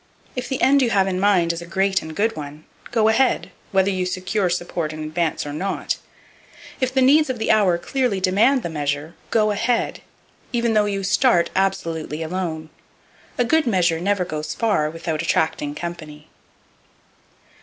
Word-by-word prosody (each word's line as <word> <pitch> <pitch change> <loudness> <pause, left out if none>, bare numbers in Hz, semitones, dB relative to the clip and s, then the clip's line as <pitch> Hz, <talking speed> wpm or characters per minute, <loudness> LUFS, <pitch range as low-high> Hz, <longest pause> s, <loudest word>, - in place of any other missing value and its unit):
If 250 -1 -4
the 265 - -2
end 280 +1 +5
you 245 - +2
have 195 -4 +3
in 185 -1 -1
mind 185 -4 +3
is 170 - -6
a 170 - -9
great 190 +2 +1
and 160 0 -8
good 225 +5 +1
one, 150 0 -8 0.3
go 225 -2 +2
ahead, 250 +4 +2 0.2
whether 195 0 +3
you 185 -1 -1
secure 185 +1 -1
support 170 -2 -2
in 155 0 -6
advance 155 0 -1
or 145 - -5
not. 190 +6 -2 0.8
If 255 -1 0
the 260 0 +2
needs 295 +3 +5
of 255 - -2
the 220 - +1
hour 200 -5 +4
clearly 245 +2 -1
demand 220 +8 +3
the - - -3
measure, 145 0 -3 0.2
go 215 -2 +2
ahead, 230 +3 0 0.5
even 235 -2 +1
though 210 -1 +3
you 200 -1 -2
start 195 -2 +3
absolutely 165 -5 -1
alone. 160 -2 -4 0.7
A 245 - +2
good 320 +2 +2
measure 175 -6 +2
never 195 +1 0
goes 155 -2 -4
far 205 -10 +1
without 160 -1 -3
attracting 155 -3 0
company. 155 -3 -7
185 Hz, 170 wpm, -22 LUFS, 160-220 Hz, 0.8 s, end